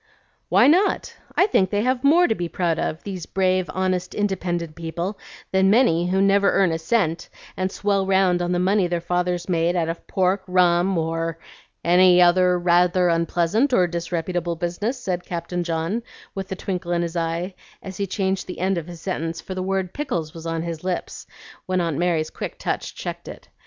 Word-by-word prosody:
"Why - - +5
not? 355 +8 +2 0.2
I - - +6
think 195 - +2
they 205 +1 0
have 255 0 0
more 335 +5 +5
to - - +2
be 175 -5 -4
proud 170 -3 -1
of, 155 - -3
these 185 -4 -6
brave, 185 -2 +1
honest, 185 0 -1
independent 175 -5 -2
people, 170 +5 -4 0.3
than 190 0 +3
many 195 -7 +3
who 190 +2 +2
never 200 0 +4
earn 190 -3 +3
a 165 - -2
cent 165 -2 0 0.3
and 185 0 -2
swell 200 -2 0
round 190 -2 +3
on 175 0 -1
the 180 - +1
money 190 +1 +2
their 175 0 -1
fathers 180 0 -1
made 170 -1 +1
out 165 -2 0
of 165 - -6
pork, 190 +1 +1
rum, 180 0 +3
or 165 0 -2 0.5
any 180 +1 +5
other 180 0 +5
rather 175 +1 +3
unpleasant 170 - +1
or 185 -7 +5
disreputable 170 0 -2
business," 180 +9 -3
said 180 -6 -3
Captain 175 0 -4
John, 165 +6 -2 0.3
with 195 -1 -5
the 190 - -4
twinkle 180 -2 -4
in 170 0 +1
his 170 0 -4
eye, 170 +3 -2 0.3
as 190 -2 -8
he 200 - -2
changed 190 -1 -1
the 180 - -7
end 185 0 0
of 165 - -9
his 170 -2 -10
sentence, 165 -3 -3
for 190 - -7
the 185 - -3
word 190 -1 -2
"pickles" 240 - -3
was 165 0 -8
on 165 0 -2
his 170 -1 -5
lips 185 -1 -4 0.4
when 185 0 0
Aunt 165 -4 -1
Mary's 170 -3 0
quick - - -6
touch - - -3
checked - - -6
it. - - -10
180 Hz, 195 wpm, -23 LUFS, 170-190 Hz, 0.5 s, I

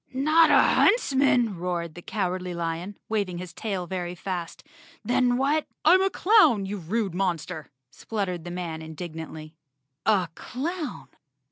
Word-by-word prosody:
"Not 310 +4 +5
a - - +6
huntsman?" 265 - +3
roared 170 -2 -3
the 175 - -10
Cowardly 180 -3 -3
Lion, 170 +4 -4
wav¬ 210 -3 0
ing 175 - -5
his 180 -1 -7
tail 195 -3 -3
very 175 0 -4
fast. 175 -2 -5 0.4
"Then 245 0 +2
what—" 290 +4 +1 0.2
"I'm 375 +1 +7
a 385 - +3
clown, 355 - +4
you 205 +2 -4
rude 195 +2 -2
monster," 175 -3 -2 0.2
spluttered 185 -1 -4
the 175 - -7
man 175 -3 -5
indignantly. 160 -1 -8 0.5
A 200 -5 +3
clown! 310 - -5
185 Hz, 140 wpm, -26 LUFS, 175-245 Hz, 0.5 s, I'm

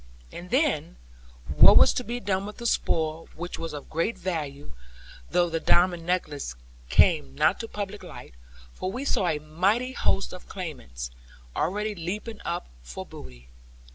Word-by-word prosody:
And 175 +1 -8
then, 255 - +1 0.5
what - - +8
was - - +7
to 250 - -2
be 240 +1 -3
done 195 -2 -1
with 210 - -8
the 240 - -7
spoil, 160 -7 0
which 175 +2 -5
was 165 0 -4
of 145 -1 -7
great 165 +8 -1
value; 145 - -4 0.6
though 175 -1 +3
the 165 -1 -1
diamond 175 0 +3
necklace 150 - -1 0.3
came 65 -1 +4
not 170 - +3
to 225 - -4
public 205 -1 -5
light? - - -10 0.4
For 185 - -3
we 255 +6 -4
saw 200 -9 +1
a 155 - +2
mighty 190 +12 +1
host 195 - 0
of 180 - -10
claimants 95 - -6 0.4
already 210 +4 0
leaping 205 +5 -5
up 175 - -3
for - - -7
booty. 60 -1 -12
175 Hz, 160 wpm, -27 LUFS, 155-205 Hz, 0.6 s, what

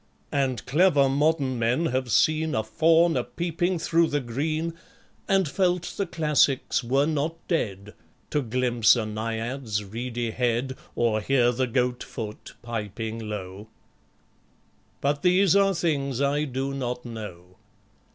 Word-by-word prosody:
And 130 -5 -1
clever 145 -1 +4
modern 140 -2 +1
men 120 +8 +1
have 130 -4 -1
seen 155 +6 +2
A 110 - +1
Faun 165 +8 +3
a - - +1
peeping 175 +1 -2
through 165 0 +2
the 145 - 0
green, 155 +7 -2 0.5
And 195 -3 +3
felt 180 +2 0
the 200 - -2
Classics 150 -7 +1
were 135 +4 +2
not 155 +1 -1
dead, 105 - -2 0.4
To 150 - +1
glimpse 120 -1 +3
a 115 -3 -1
Naiad's 110 +1 -3
reedy 120 +2 -4
head, 125 +2 -1 0.2
Or 115 -2 +1
hear 120 +1 +3
the 130 +1 -1
Goat 125 0 0
foot 105 -2 -7
piping 110 -1 -5
low:... 100 0 -6 1.3
But 145 +1 0
these 185 +1 +4
are 195 -1 +4
things 140 -6 -1
I 140 +2 +1
do 135 0 -3
not 125 -2 -4
know. 95 -6 -9
130 Hz, 135 wpm, -26 LUFS, 115-155 Hz, 1.3 s, clever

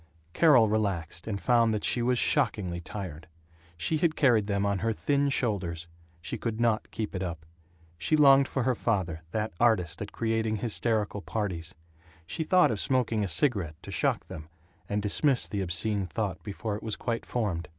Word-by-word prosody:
Carol 135 -9 +6
relaxed, 100 -5 -2
and 100 -3 -2
found 115 -2 +3
that 105 - -3
she 120 - +1
was 125 +1 +2
shockingly 90 -7 +1
tired. 85 -3 -7 0.5
She 120 - 0
had 155 0 +1
carried 120 -8 +3
them 100 -1 0
on 100 -1 0
her 115 +2 0
thin 140 +5 +1
shoulders. 90 -10 -1 0.4
She 120 - -4
could 115 -1 -3
not 115 -2 +1
keep 110 -2 -4
it 95 - -3
up. 85 -4 -5 0.5
She 155 - +2
longed 140 -2 +6
for 135 - -2
her 130 - +2
father, 95 -9 -1
that 110 +2 -2
artist 90 -9 +2
at - - -5
creating 110 -1 -1
hysterical 110 -1 -1
parties. 95 -5 -4 0.5
She 160 - -3
thought 180 -1 +4
of 105 - -2
smoking 120 -4 +1
a - - -1
cigarette, 90 - 0
to - - -8
shock - - 0
them, 75 0 -9 0.4
and 105 0 -1
dismissed 130 +5 +1
the 100 - -1
obscene 95 +2 -1
thought 100 -2 -3
before 105 +1 -4
it 105 - -7
was 110 -2 -3
quite 115 -1 -3
formed. 95 -9 -2
105 Hz, 180 wpm, -28 LUFS, 95-120 Hz, 0.5 s, Carol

